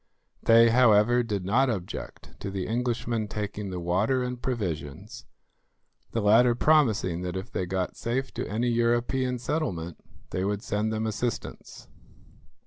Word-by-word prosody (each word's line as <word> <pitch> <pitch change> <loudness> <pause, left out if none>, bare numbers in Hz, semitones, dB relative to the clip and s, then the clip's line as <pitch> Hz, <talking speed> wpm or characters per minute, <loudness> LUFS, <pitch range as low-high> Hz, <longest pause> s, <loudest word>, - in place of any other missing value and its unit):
They, 115 0 +6
however, 120 0 +5
did 105 -6 -3
not 125 +7 +3
object 95 -6 -5
to - - -5
the 95 -1 -4
Englishmen 115 -1 -1
taking 105 -1 -4
the 90 -1 -4
water 100 +9 +1
and 125 -1 -4
provisions, 85 - -4 0.8
the 115 - -2
latter 120 +4 +5
promising 115 - +2
that 90 0 -3
if 100 +7 -7
they 90 - -2
got 95 0 -2
safe 130 +3 -3
to - - -4
any 115 +4 0
European 120 +2 +1
settlement 95 - -3 0.3
they 95 - -1
would 100 +2 -2
send 105 0 -1
them 110 0 -2
assistance. 115 +2 -4
110 Hz, 140 wpm, -27 LUFS, 95-120 Hz, 0.8 s, They